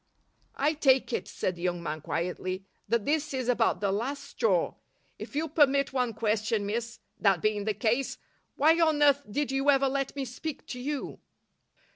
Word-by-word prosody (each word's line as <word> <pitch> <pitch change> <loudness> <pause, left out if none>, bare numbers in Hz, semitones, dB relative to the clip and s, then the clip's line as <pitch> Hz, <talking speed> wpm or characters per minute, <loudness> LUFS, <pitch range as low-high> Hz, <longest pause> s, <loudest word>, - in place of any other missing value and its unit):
"I 295 +3 +2
take 270 -4 +3
it," - - -2
said 185 - -2
the 170 - -11
young 175 -1 -1
man, 155 -1 -4
quietly, 185 +4 -3 0.2
"that 235 -3 +1
this 305 -1 0
is 255 -2 -2
about 240 -4 +2
the 200 -2 +1
last 265 +8 -2
straw. 220 -10 +1 0.5
If - - -8
you'll 315 +2 0
permit 280 -2 +3
one 250 -4 0
question, 215 -1 0
miss, 225 +2 -3 0.2
that 195 -4 +3
being 210 +2 0
the 215 -1 0
case, 230 +6 0 0.4
why 320 +4 +4
on 315 -3 +3
earth 285 -1 +5
did 285 +5 -1
you 270 +1 +1
ever 275 -1 +5
let 275 0 -2
me 275 -1 -2
speak 270 +4 -6
to 250 - -5
you?" 285 +2 -4
250 Hz, 180 wpm, -28 LUFS, 210-280 Hz, 0.5 s, earth